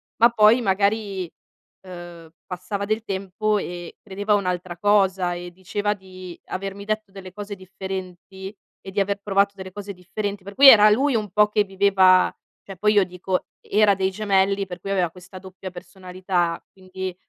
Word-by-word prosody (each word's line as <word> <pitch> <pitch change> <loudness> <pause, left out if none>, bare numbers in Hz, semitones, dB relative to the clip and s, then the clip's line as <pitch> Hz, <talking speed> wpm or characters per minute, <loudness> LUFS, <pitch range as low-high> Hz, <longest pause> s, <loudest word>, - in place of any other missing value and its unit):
ma 235 +1 +5
poi 230 +1 +5
magari, 200 -2 0 0.5
ehm, 175 -3 -11 0.2
passava 185 +3 -5
del 215 +2 -1
tempo 200 +1 -2
e 175 -3 -6
credeva 205 +1 -2
a - - +6
un'altra 180 -2 -3
cosa 190 -2 +2
e 175 0 -7
diceva 205 +3 -2
di 185 -3 -11
avermi 195 +1 -6
detto 215 -1 -3
delle 190 -2 -11
cose 205 0 -7
differenti 190 +1 -8 0.2
e - - -10
di 200 +1 0
aver 200 +1 -1
provato 200 0 +1
delle 185 -1 -9
cose 205 0 -7
differenti. 200 +2 -5
Per 200 0 -9
cui 275 0 +10
era 215 -3 +8
lui 265 +7 +2
un 215 -2 -1
po' 210 +3 +3
che 210 0 +1
viveva 190 -1 +4 0.3
cioè 195 -2 -10
poi 210 +3 +2
io 205 -2 +5
dico, 180 +1 -3
era 210 -1 +3
dei 190 0 0
gemelli, 195 -1 +1
per 180 -1 -8
cui 195 +3 -6
aveva 180 -4 +1
questa 180 +1 -12
doppia 190 0 -10
personalità, 180 -1 -3
quindi 185 -1 -7
195 Hz, 170 wpm, -23 LUFS, 185-205 Hz, 0.5 s, cui